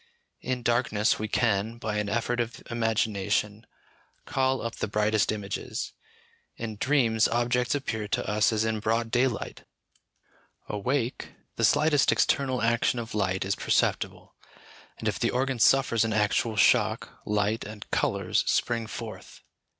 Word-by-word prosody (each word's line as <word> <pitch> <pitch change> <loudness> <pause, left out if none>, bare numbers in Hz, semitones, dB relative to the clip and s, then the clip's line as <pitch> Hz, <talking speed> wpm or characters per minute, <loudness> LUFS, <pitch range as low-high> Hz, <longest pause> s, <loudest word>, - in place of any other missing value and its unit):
In 125 -1 -3
darkness 115 -3 +1
we 110 - -2
can, 110 0 0
by 110 -2 -3
an 105 -1 -1
effort 120 +3 -1
of 120 0 -3
imagination, 105 -2 0 0.6
call 130 0 0
up 115 0 -4
the - - -2
brightest 105 0 +1
images; 105 -2 -4 0.6
in 110 -2 -5
dreams 115 -4 +3
objects 120 +2 +1
appear 110 -6 -3
to - - -2
us 105 +1 +2
as 110 0 +1
in 110 -1 -1
broad 115 +2 0
daylight; 120 -2 -1 1.0
awake, 120 +4 -2 0.2
the - - -2
slightest 150 -1 +4
external 130 -4 +1
action 115 +1 +2
of 115 -1 -5
light 95 -3 0
is 100 - 0
perceptible, - - -1 0.6
and - - -4
if - - -1
the - - +1
organ 130 0 -1
suffers 115 -2 +4
an 110 -1 -1
actual 110 +1 +1
shock, 100 - +2
light 105 +2 0
and 105 0 -9
colours - - +1
spring 115 -2 0
forth. - - -8
115 Hz, 140 wpm, -27 LUFS, 105-120 Hz, 1.0 s, slightest